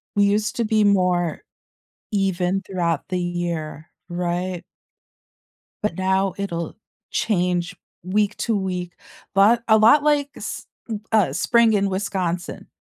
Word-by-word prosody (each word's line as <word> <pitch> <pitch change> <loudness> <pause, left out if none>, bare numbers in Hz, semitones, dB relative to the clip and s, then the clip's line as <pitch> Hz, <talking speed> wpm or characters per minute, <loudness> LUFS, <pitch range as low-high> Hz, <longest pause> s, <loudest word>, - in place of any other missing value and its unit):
We 205 0 +4
used 210 +1 +1
to 235 - +1
be 215 0 +2
more 180 -4 +2 0.7
even 195 -1 0
throughout 170 -5 -1
the 185 - -1
year, 170 -3 -4 0.2
right? 175 0 -2 1.2
But 210 -6 -1
now 190 0 +1
it'll 170 -5 -4 0.3
change 180 -3 0 0.3
week 205 +3 0
to 225 -2 0
week, 180 -2 -3 0.4
but 215 +5 +5
a 220 0 +6
lot 230 +7 +6
like 290 -1 +2
s - - -6 0.2
m 215 -2 -3
uh, 205 -11 +3
spring 230 - +3
in 200 -1 +2
Wisconsin, 185 -2 -3
190 Hz, 125 wpm, -22 LUFS, 175-210 Hz, 1.2 s, a